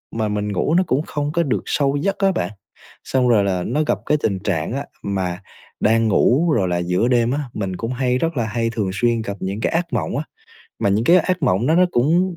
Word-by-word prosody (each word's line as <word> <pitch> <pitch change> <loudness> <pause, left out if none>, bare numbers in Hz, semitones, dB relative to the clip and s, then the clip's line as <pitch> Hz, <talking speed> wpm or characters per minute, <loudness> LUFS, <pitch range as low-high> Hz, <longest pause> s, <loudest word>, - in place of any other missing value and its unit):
mà 110 -1 0
mình 105 0 -2
ngủ 120 - 0
nó 185 - +4
cũng 130 - +1
không 145 -2 -3
có 170 +1 +1
được 135 -6 -1
sâu 140 -1 +1
giấc 195 +7 -1
á 195 -1 +3
bạn. 90 - -2 0.5
Xong 130 -1 +1
rồi 110 -4 +4
là 95 -2 -1
nó 145 +10 0
gặp 100 - +1
cái 150 - +2
tình 95 -3 0
trạng 95 -2 -2
á 140 +2 -3 0.2
mà 95 -2 -2 0.4
đang 115 +1 +3
ngủ 140 - +3
rồi 95 -5 +1
là 90 -1 0
giữa 90 +6 0
đêm 120 -1 +2
á, 140 - -1
mình 95 -3 -3
cũng 115 +6 -4
hay 125 0 0
rất 165 +2 -2
là 120 - +1
hay 115 +1 -1
thường 110 -4 -2
xuyên 120 +2 +1
gặp 100 -2 -5
những 95 +2 -3
cái - - 0
ác 170 0 -1
mộng - - -1
á, 145 - -1 0.6
mà - - +2
những 105 +4 +1
cái 170 +7 +6
ác 180 0 -1
mộng 115 -3 +2
đó 160 - +3
nó 180 +2 +5
cũng 170 +7 +2
120 Hz, 250 wpm, -20 LUFS, 100-150 Hz, 0.6 s, cái